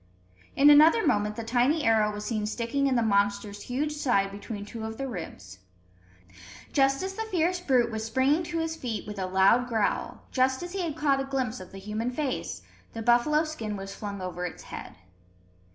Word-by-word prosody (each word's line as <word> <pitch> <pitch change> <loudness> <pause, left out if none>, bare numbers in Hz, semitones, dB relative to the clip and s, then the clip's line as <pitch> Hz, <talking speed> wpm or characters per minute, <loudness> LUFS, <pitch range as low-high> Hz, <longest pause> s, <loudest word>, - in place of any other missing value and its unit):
In 290 +2 +7
another 315 +10 +6
moment 210 0 +1
the 230 - -5
tiny 250 +7 +2
arrow 220 -2 +3
was 210 0 -6
seen 210 -1 -1
sticking 235 +5 -1
in 265 - +1
the 235 - +2
monster's 205 -1 0
huge 285 +5 -2
side 240 -10 +1
between 205 +1 -7
two 225 +1 -7
of 220 0 -5
the 270 - -3
ribs. 95 - -8 1.1
Just 275 +2 +3
as 380 0 -3
the 445 - -5
fierce 360 -1 +1
brute 255 -8 +2
was 220 0 -3
springing 260 +8 +2
to 335 0 -4
his 325 0 -2
feet 240 -8 -4
with 210 -1 -7
a 185 - -2
loud 190 +7 +4
growl, 220 -4 -1
just 260 +3 +1
as 350 +1 -7
he 390 - -2
had 320 -3 -3
caught 285 -3 +2
a - - 0
glimpse 260 -3 -2
of 185 - -11
the 195 - -10
human 210 +4 -3
face, 265 0 -3 0.3
the 225 - -5
buffalo 245 +7 +4
skin 225 -10 -5
was 195 0 -7
flung 200 -1 -6
over 180 -1 -5
its 180 - -6
head. - - -9
235 Hz, 200 wpm, -27 LUFS, 210-285 Hz, 1.1 s, In